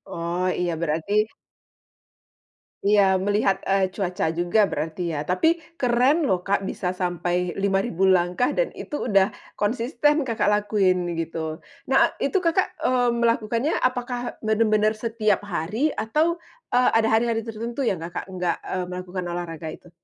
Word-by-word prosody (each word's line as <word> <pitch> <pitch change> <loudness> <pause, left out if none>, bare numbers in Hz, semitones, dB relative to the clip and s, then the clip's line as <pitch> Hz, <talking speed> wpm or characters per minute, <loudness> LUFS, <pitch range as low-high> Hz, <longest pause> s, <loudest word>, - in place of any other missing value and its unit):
Oh, 170 +2 -1
iya 175 -1 0
berarti 165 +5 -1 1.7
Iya, 200 -2 +4
melihat, 195 0 +1
eee, 195 -1 +2
cuaca 190 -2 -2
juga 175 +5 +2
berarti 165 +2 -3
ya, 150 -2 -3
tapi 325 - +2 0.2
keren 255 +5 +3
loh, 180 -1 0
Kak, 200 0 +1
bisa 180 0 -2
sampai 180 0 -1
5000 195 -1 +1
langkah 180 +4 +2
dan - - +1
itu 295 - -5
udah 195 -1 +3 0.2
konsisten 255 +7 +1
Kakak 230 -4 -1
lakuin, 195 -4 +1
gitu. 160 -1 -3 0.3
Nah, 265 - +4
a - - +2
itu 335 +8 +1
Kakak, 355 +1 +1
eee, 245 -1 +3
melakukannya, 230 +4 +1
apakah 245 -1 -2
benar 220 +1 +2
benar, 215 0 +3
setiap 215 -2 0
hari 205 - -1
atau, 305 +9 0 0.3
eee, 250 0 +4
ada 225 0 +3
hari 220 +2 +3
hari 230 -1 0
tertentu 230 +3 -5
yang 215 -7 +1
Kakak 170 +3 -6
nggak, 180 -2 -1
eee, 185 -1 -3
melakukan 180 0 -5
olahraga 170 -2 -5
itu? 175 - -14
200 Hz, 145 wpm, -24 LUFS, 180-235 Hz, 1.7 s, Iya